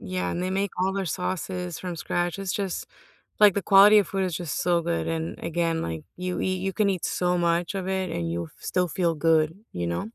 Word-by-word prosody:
Yeah, 90 -1 -3
and 175 - -2
they 185 - -1
make 195 +1 0
all 190 +1 +2
their 195 -1 -1
sauces 180 0 -3
from 180 -2 -5
scratch, 175 +3 -2
it's 195 -1 -2
just 195 -3 -3 0.5
like, 205 -3 +7
the 200 - -1
quality 205 +3 +8
of 200 - +2
food 195 -1 -1
is 175 -4 -2
just 170 -4 -3
so 175 -1 +2
good, 80 - -1
and 80 +1 -3
again, 165 0 0
like, 80 -1 -4
you 180 0 -3
eat 185 0 0
you 195 - -1
can 210 +1 +2
eat 185 -3 -2
so 180 0 +1
much 170 +2 +1
of 190 -1 -3
it 190 -2 -1
and 85 - -2
you'll 85 0 -3
f - - -19
still 180 -1 0
feel 170 0 0
good, 160 0 +3 0.2
you 85 -1 -3
know? 85 - -3
175 Hz, 235 wpm, -26 LUFS, 160-190 Hz, 0.5 s, quality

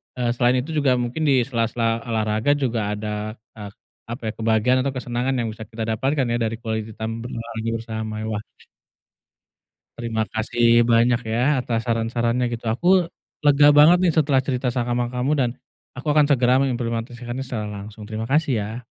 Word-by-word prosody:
eee, 125 -2 -1
selain 120 +1 +3
itu 140 - -9
juga 140 -3 +3
mungkin 125 +6 -2
di 135 -3 +4
sela-sela 115 -2 -1
olahraga 110 +3 +1
juga 115 -7 -1
ada, 105 0 -4 0.2
eee, 105 -1 -7 0.4
apa 115 +3 -7
ya, - - -5
kebahagiaan 115 +3 +2
atau 135 - -1
kesenangan 125 0 -2
yang 115 - -2
bisa 110 0 -8
kita 110 +1 -6
dapatkan 135 +1 0
ya 120 - +1
dari 115 -1 -1
quality 110 -1 -4
time 110 +1 -5
berolahraga 115 -1 -4
bersama, 110 -1 -4
wah 105 -1 -3 1.5
terima 115 -2 -1
kasih 115 +1 +3
banyak 120 0 +4
ya, 125 +5 +1
atas 115 -2 -2
saran-sarannya, 115 +1 0
gitu. 120 0 -6
Aku 155 +11 0 0.6
lega 145 0 +6
banget 155 +4 +7
nih 175 -3 +3
setelah 145 -4 +3
cerita 125 -1 -1
sama 120 0 -1
kamu 125 +3 -1
dan 130 -4 +1 0.5
aku 130 - -7
akan 150 -1 +5
segera 130 -1 +4
mengimplementasikannya 120 0 -3
secara 115 -5 -4
langsung. 105 +1 -8
Terima 110 +1 -4
kasih, 150 0 +2
ya. 110 +4 -6
120 Hz, 165 wpm, -22 LUFS, 110-130 Hz, 1.5 s, banget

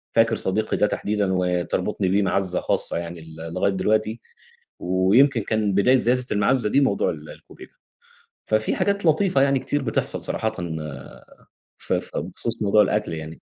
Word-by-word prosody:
فاكر 115 0 +4
صديقي 105 +3 -1
ده 105 - +3
تحديدًا 105 -1 -1
وتربطُني 90 +2 -1
بيه 100 +2 +2
مَعزَّة 95 -1 0
خاصة - - -1
يعني 85 -1 -6
ل 80 +1 -9
لغاية 95 +2 +1
دلوقتي 110 +3 0 0.6
ويمكن 100 +8 +3
كان 105 -2 0
بداية 125 +7 +4
زيادة 125 +1 +1
المَعزَّة 105 +2 +2
دي 140 - +3
موضوع 100 -8 +1
ال 75 -1 -7
الكُوبيبة. - - -13 0.7
ففي 110 0 0
حاجات 200 -2 0
لطيفة 160 -2 +3
يعني 135 -1 +3
كتير 145 +2 -2
بتحصل 115 - -1
صراحةً 110 0 -1 1.3
ف - - -3
ف - - -3
بخصوص 115 -1 -4
موضوع 105 +1 +4
الأكل 105 -5 -1
يعني. 80 0 -7
105 Hz, 150 wpm, -23 LUFS, 95-120 Hz, 1.3 s, فاكر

